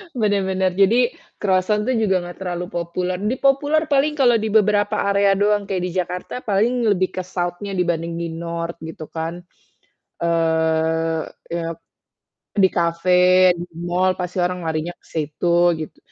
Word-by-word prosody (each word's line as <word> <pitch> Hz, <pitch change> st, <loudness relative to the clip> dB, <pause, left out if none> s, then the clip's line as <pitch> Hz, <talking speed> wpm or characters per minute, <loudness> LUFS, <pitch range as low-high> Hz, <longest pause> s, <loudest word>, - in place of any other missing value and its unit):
Bener 205 Hz, -4 st, +1 dB
bener. 190 Hz, -1 st, 0 dB
Jadi 225 Hz, +6 st, +4 dB, 0.3 s
kroisan 210 Hz, +3 st, +1 dB
tuh 260 Hz, -, +1 dB
juga 205 Hz, -5 st, +2 dB
nggak 175 Hz, 0 st, -8 dB
terlalu 175 Hz, -1 st, -3 dB
populer. 175 Hz, +1 st, -3 dB
Di 245 Hz, +5 st, -1 dB
populer 290 Hz, +3 st, +2 dB
paling 285 Hz, +1 st, +2 dB
kalau 245 Hz, -3 st, +5 dB
di 220 Hz, -1 st, -1 dB
beberapa 205 Hz, -1 st, +2 dB
area 200 Hz, 0 st, +3 dB
doang 205 Hz, 0 st, +2 dB
kayak 190 Hz, -2 st, -3 dB
di -, -, -5 dB
Jakarta 180 Hz, 0 st, -4 dB
paling 230 Hz, +4 st, +1 dB
lebih 185 Hz, -1 st, 0 dB
ke 185 Hz, -, -2 dB
south-nya 180 Hz, +2 st, -4 dB
dibanding 170 Hz, -2 st, -1 dB
di 170 Hz, -, -2 dB
north 170 Hz, 0 st, -4 dB
gitu 160 Hz, -1 st, -8 dB
kan. 165 Hz, +2 st, -5 dB, 0.8 s
Eee, 160 Hz, -1 st, +1 dB, 0.3 s
e 170 Hz, -, -1 dB
ap 165 Hz, -, -10 dB, 0.8 s
di 190 Hz, -, +6 dB
kafe, 180 Hz, +2 st, +4 dB
di 175 Hz, -, -5 dB, 0.2 s
mal 185 Hz, +2 st, +2 dB
pasti 180 Hz, +1 st, -4 dB
orang 180 Hz, 0 st, -1 dB
larinya 160 Hz, +2 st, -2 dB
ke -, -, -28 dB
situ 160 Hz, +2 st, -2 dB, 0.3 s
gitu. 155 Hz, -, -8 dB
180 Hz, 155 wpm, -21 LUFS, 170-205 Hz, 0.8 s, di